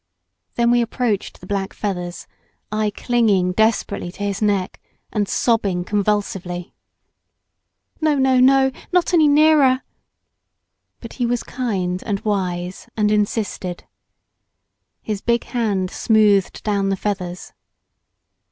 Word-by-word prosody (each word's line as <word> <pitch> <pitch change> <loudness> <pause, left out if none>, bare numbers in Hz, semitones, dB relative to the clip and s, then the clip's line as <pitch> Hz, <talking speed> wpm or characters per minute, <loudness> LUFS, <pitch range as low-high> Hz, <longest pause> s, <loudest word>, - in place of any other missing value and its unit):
Then 235 0 +3
we 240 0 +4
approached 230 -3 -2
the - - -10
black 195 0 -3
feathers, 180 -4 -4 0.5
I 215 0 0
clinging 205 -5 +1
desperately 220 -3 0
to 205 - -7
his 200 0 -2
neck, 200 -3 0 0.3
and 205 -2 0
sobbing 200 -7 +1
convulsively. 195 -3 -2 1.3
"No 310 -1 +3
no 265 -2 +3
no 265 +1 +5 0.2
not 360 0 +2
any 320 -3 +5
nearer!" 290 -3 +4 1.2
But 230 - -9
he 240 - +2
was 240 0 -1
kind 190 -8 -2
and 200 -2 -2
wise, 185 -1 -3
and 210 -1 +2
insisted. 205 -4 -1 1.2
His 210 -2 -3
big 235 0 +1
hand 205 -7 -1
smoothed 210 -4 +2
down 200 -2 0
the 195 - 0
feathers. 185 -3 -4
210 Hz, 115 wpm, -20 LUFS, 190-240 Hz, 1.3 s, no